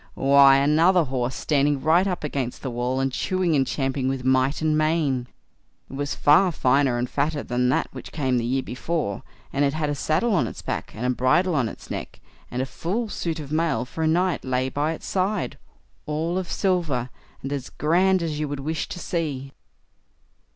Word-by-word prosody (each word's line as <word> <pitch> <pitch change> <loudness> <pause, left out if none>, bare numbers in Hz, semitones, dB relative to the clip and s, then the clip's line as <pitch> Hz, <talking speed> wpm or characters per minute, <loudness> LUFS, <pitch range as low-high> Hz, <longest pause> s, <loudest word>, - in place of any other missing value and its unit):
why, 140 0 +6
another 165 +6 +4
horse 130 -2 -2
standing 145 -1 +1
right 165 +7 +3
up 180 -4 -3
against 135 -4 -3
the 130 - -3
wall, 125 +2 -1
and 135 0 0
chewing 180 +4 0
and 135 -2 +2
champing 135 -1 -1
with 130 -1 -2
might 130 +1 +2
and 155 -1 +1
main. 155 -5 +1 0.6
It - - -10
was 140 +1 -3
far 170 +6 +5
finer 135 -3 +2
and 120 +1 -1
fatter 145 +3 -1
than 125 0 0
that 130 - +1
which 130 - -9
came 130 -5 0
the - - -2
year 130 +3 0
before, 125 - -3 0.3
and 140 - +1
it 140 +1 +1
had 150 -2 -1
a - - 0
saddle 160 +10 0
on 180 - +2
its - - -8
back, - - -4
and 115 +3 -4
a 125 - +2
bridle 155 +9 +2
on 130 -7 +1
its - - -11
neck, - - -6 0.3
and 125 +1 -2
a - - -2
full 205 - -3
suit 165 -5 -3
of 145 -2 -8
mail 155 -7 0
for 160 +5 -5
a - - +2
knight 175 +1 +1
lay 130 0 0
by 150 +4 -1
its - - -9
side, 195 +1 -1 0.5
all 160 +3 -1
of 185 - -6
silver, 160 - 0 0.3
and 135 +2 -3
as 140 -2 -4
grand 180 +4 +2
as 155 -2 -3
you 150 - -1
would 145 -1 -4
wish 155 +2 -2
to - - -6
see. 145 -7 -3
145 Hz, 200 wpm, -24 LUFS, 130-165 Hz, 0.6 s, why